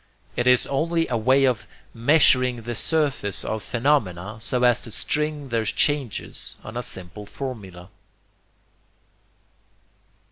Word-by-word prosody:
It 120 Hz, -, 0 dB
is 125 Hz, -1 st, +5 dB
only 165 Hz, +4 st, 0 dB
a 125 Hz, -, 0 dB
way 130 Hz, +4 st, +4 dB
of 125 Hz, -5 st, 0 dB, 0.3 s
measuring 125 Hz, -2 st, +4 dB
the 120 Hz, +1 st, -4 dB
surface 140 Hz, -, 0 dB
of 110 Hz, 0 st, -2 dB
phenomena 110 Hz, -6 st, 0 dB
so 125 Hz, +2 st, -1 dB
as 125 Hz, 0 st, +4 dB
to 115 Hz, -, -8 dB
string 150 Hz, +4 st, -1 dB
their 115 Hz, -1 st, 0 dB
changes 135 Hz, +2 st, -1 dB
on 110 Hz, -, -9 dB
a 120 Hz, -, -2 dB
simple 100 Hz, -1 st, -5 dB
formula. 100 Hz, -9 st, -7 dB
125 Hz, 120 wpm, -24 LUFS, 110-140 Hz, 0.3 s, is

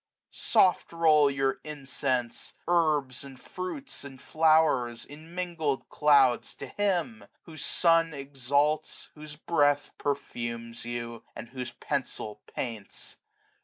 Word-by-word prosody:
^^ -, -, -20 dB
Soft 185 Hz, -, +3 dB
roll 155 Hz, -3 st, +5 dB
your 135 Hz, -1 st, 0 dB
incense, 135 Hz, -4 st, -3 dB
herbs, 150 Hz, -7 st, +2 dB
andfruits, 185 Hz, -, -7 dB
andflow'rs. 140 Hz, -3 st, +2 dB
In 155 Hz, +4 st, -13 dB
mingled 165 Hz, -6 st, -2 dB
clouds 140 Hz, -5 st, +4 dB
to -, -, -7 dB
Him; 205 Hz, -, -1 dB, 0.2 s
whose 155 Hz, -3 st, -7 dB
sun 165 Hz, -1 st, +3 dB
exalts. 145 Hz, +2 st, -1 dB
Whose 150 Hz, -1 st, -9 dB
breath 145 Hz, -2 st, +2 dB
perfumes 120 Hz, -5 st, -4 dB
you, 120 Hz, -1 st, -5 dB
and -, -, -7 dB
whose 125 Hz, -1 st, -5 dB
pencil 105 Hz, -1 st, -3 dB
paints. 115 Hz, -5 st, -5 dB
145 Hz, 105 wpm, -28 LUFS, 130-160 Hz, 0.2 s, roll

